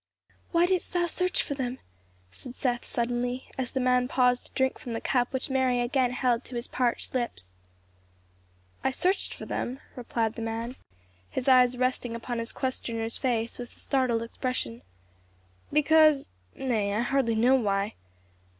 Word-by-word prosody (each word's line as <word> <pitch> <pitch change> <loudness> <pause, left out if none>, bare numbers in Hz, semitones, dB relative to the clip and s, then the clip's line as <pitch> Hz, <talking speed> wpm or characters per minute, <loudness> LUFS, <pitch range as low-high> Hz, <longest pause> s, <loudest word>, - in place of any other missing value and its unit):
"Why 340 0 +4
didst 365 -1 0
thou 350 -1 +2
search 360 +2 +1
for - - -3
them," 260 -2 -3 0.5
said 250 - -8
Seth 245 -3 -1
suddenly, 245 +1 -1
as 255 -2 -3
the 265 - 0
man 250 0 +3
paused 250 -1 +2
to - - -14
drink 265 -1 +1
from 240 - -6
the 225 - -2
cup 245 -2 +1
which 265 0 -2
Mary 260 -2 +2
again 250 +1 +2
held 245 -1 +1
to 255 - -8
his 235 +1 -2
parched 245 -2 0
lips. 160 - -3 1.3
"I - - +3
searched 365 +9 0
for - - -7
them," 255 +2 -3 0.2
replied 230 -2 -1
the 230 - -7
man, 225 +2 -3 0.5
his 250 - -3
eyes 250 -1 +6
resting 255 -2 0
upon 235 +1 -3
his 230 +1 -3
questioner's 230 -3 -2
face 235 -3 -1
with 245 -1 -8
a - - -17
startled 255 -4 +1
expression, 230 - -3 0.9
"because 305 -1 +5 0.2
Nay, 215 -6 0
I 215 - +2
hardly 245 -2 +1
know 240 +4 +5
why. 205 -5 +1
250 Hz, 160 wpm, -28 LUFS, 235-265 Hz, 1.3 s, eyes